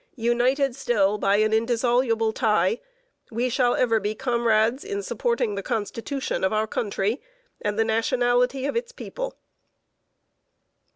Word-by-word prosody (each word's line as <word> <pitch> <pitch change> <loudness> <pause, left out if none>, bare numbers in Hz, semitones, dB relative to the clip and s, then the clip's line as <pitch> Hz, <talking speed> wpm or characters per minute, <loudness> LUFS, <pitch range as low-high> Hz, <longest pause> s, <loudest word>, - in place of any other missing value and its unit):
United 245 +3 +1
still 210 -6 +1
by 200 0 +3
an 215 +1 +2
indissoluble 230 0 +1
tie, 215 -2 +2 0.5
we 240 +2 -1
shall 245 0 +2
ever 230 -3 +2
be 210 +1 -2
comrades 235 0 +1
in 405 0 -4
supporting 470 - -1
the 200 - -3
Constitution 230 +5 -3
of 190 - +2
our 215 0 +1
country 215 +1 -2 0.4
and 210 0 -2
the 225 - +3
nationality 245 +3 +1
of 285 - -2
its 475 +1 -2
people." - - -6
235 Hz, 130 wpm, -24 LUFS, 215-255 Hz, 0.5 s, by